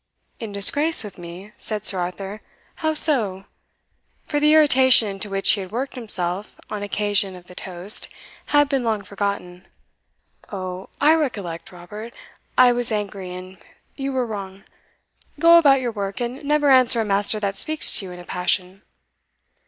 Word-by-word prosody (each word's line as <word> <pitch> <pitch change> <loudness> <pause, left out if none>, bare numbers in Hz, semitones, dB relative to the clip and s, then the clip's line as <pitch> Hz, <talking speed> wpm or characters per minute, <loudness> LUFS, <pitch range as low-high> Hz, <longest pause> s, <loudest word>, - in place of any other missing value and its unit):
"In 225 -3 -7
disgrace 285 +12 +3
with 200 -4 -10
me?" 175 +4 -10
said 215 -1 -4
Sir 190 - +2
Arthur 195 +4 -6 0.4
"how 315 -1 -1
so?" 215 - +2 0.8
for 295 - -2
the 300 +1 +3
irritation 260 -6 +6
into 200 +1 -5
which 195 0 +3
he 205 - +1
had 185 0 -9
worked 255 +5 -4
himself 200 -5 -3
on 210 -1 -4
occasion 205 -1 -1
of 180 -1 -14
the 180 - -14
toast 180 +2 0 0.4
had 290 0 +3
been 275 -2 -1
long 220 -3 -2
forgotten. 195 -3 -5 0.8
"O, 185 -1 -6
I 300 +2 +5
recollect 205 - -3
Robert, 210 +6 -10 0.4
I 250 -1 +6
was 245 -1 -1
angry, 200 -3 -4
and 185 0 -11 0.4
you 275 -1 -4
were 260 -2 -1
wrong; 195 -3 -8 0.7
go 335 0 +7
about 275 -4 +4
your 245 -2 -2
work, 200 -2 -5
and 245 +4 -5
never 295 0 +2
answer 255 -2 +5
a 225 - 0
master 205 +1 0
that 200 -1 -3
speaks 310 0 +5
to 195 - -6
you - - -9
in 180 - -10
a - - -10
passion." 180 +2 -2
210 Hz, 165 wpm, -21 LUFS, 190-260 Hz, 0.8 s, go